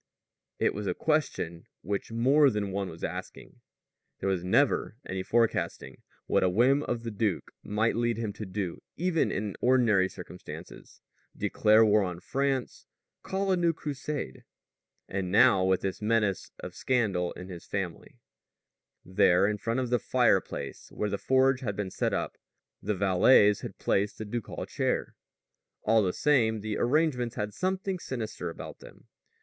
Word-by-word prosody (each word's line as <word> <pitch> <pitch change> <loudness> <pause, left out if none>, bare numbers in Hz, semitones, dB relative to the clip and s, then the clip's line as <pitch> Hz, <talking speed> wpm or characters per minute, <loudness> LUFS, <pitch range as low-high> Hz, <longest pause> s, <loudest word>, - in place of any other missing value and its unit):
It - - +1
was 105 0 -4
a - - 0
question 130 - -1 0.2
which 100 +4 -3
more 135 +6 +4
than 105 -4 -2
one 95 -1 -2
was 80 - -11
asking. - - -7 0.6
There 95 - -2
was 95 -3 0
never 115 +3 +2
any 95 0 -3
forecasting 115 +4 0 0.2
what - - +2
a 95 - +3
whim 125 +9 +3
of 120 -4 -3
the 115 - -4
duke 105 -3 -1
might 110 +2 0
lead 120 -1 0
him 110 -3 -3
to 105 +1 -7
do 95 -2 -4 0.2
even 170 -1 +1
in 100 -1 -3
ordinary 115 -7 +4
circumstances 90 0 -11 0.4
declare 110 +1 +4
war 105 0 +4
on 90 -3 -3
France, 135 +3 -2 0.3
call 195 0 -1
a - - +4
new 170 -2 +2
Crusade. 145 - -5 0.6
And 95 -2 -3
now, 95 -1 +5
with 95 0 +2
this 95 +1 -3
menace 105 -3 +1
of - - -7
scandal 100 -9 0
in 90 - -9
his 90 -2 -9
family! 95 -4 -5 0.9
There 90 0 +4
in 105 0 0
front 115 +3 -1
of 125 -1 -3
the 125 - +3
fireplace - - 0
where 105 -1 -2
the 100 - -2
forge 130 0 +3
had 110 -7 -3
been 95 -1 -3
set - - -1
up, - - -3 0.4
the 105 +1 -1
valets 100 +2 +5
had - - -7
placed 100 +1 0
the 110 - -5
ducal 115 +1 -5
chair. - - -1 0.7
All 110 +1 +4
the 95 -3 +1
same, 110 -4 +2
the 110 0 -3
arrangements 125 -3 +1
had 105 -2 -3
something 190 0 -2
sinister 110 - -5
about 80 - -9
them. - - -15
110 Hz, 160 wpm, -29 LUFS, 95-130 Hz, 0.9 s, now